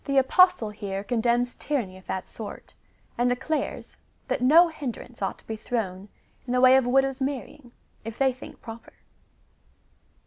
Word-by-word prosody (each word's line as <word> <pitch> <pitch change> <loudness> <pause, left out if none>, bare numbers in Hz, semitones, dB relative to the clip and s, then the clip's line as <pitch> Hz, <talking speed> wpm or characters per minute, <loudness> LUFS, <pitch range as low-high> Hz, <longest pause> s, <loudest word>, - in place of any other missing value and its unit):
Apostle 270 - +4
here 200 -1 -5
condemns 240 +2 +1
tyranny 240 -11 -3
of 185 - -16
tliat 190 - -3
sort, 220 -2 -9 0.5
and 245 +1 +3
declares, 265 +5 -3 0.3
that - - -1
no 325 +7 +6
hinderance 250 -6 -7
ought 195 - -2
to - - -20
be 220 - -3
thrown 205 -4 -4 0.4
in 245 - -1
the 250 - +3
way 255 0 +7
of 265 -2 +3
widows' 270 +1 +2
marrying, 265 -1 -4 0.3
if 225 0 -7
they 265 -1 +3
think 255 - -12
proper. 225 0 -10
245 Hz, 150 wpm, -26 LUFS, 220-270 Hz, 0.5 s, way